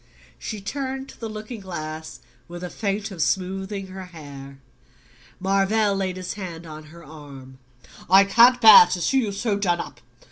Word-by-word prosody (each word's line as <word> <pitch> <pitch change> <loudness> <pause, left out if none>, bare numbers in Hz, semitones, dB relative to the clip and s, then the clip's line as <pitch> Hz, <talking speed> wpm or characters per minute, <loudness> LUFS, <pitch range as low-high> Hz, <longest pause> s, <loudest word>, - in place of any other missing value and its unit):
She 215 -2 -6
turned 265 +4 -5
to - - -15
the 225 - -5
looking 215 +2 -8
glass 155 -4 -7 0.3
with 175 +1 -9
a 180 - -6
feint 205 0 -3
of 175 -4 -6
smoothing 190 +2 -2
her 190 0 -9
hair. 140 -5 -11 0.8
Marvell 195 +2 +1
laid 190 -1 -3
his 185 -1 -5
hand 175 -5 -8
on 155 -1 -10
her 170 +2 -15
arm, 140 -4 -13 0.5
"I 190 +2 +7
can't 240 +5 +5
bear 220 -6 +9
to 180 0 -3
see 265 +10 +1
you 220 -5 -1
so 200 0 -2
done 175 -4 0
up. 120 - -8
190 Hz, 170 wpm, -23 LUFS, 165-210 Hz, 0.8 s, bear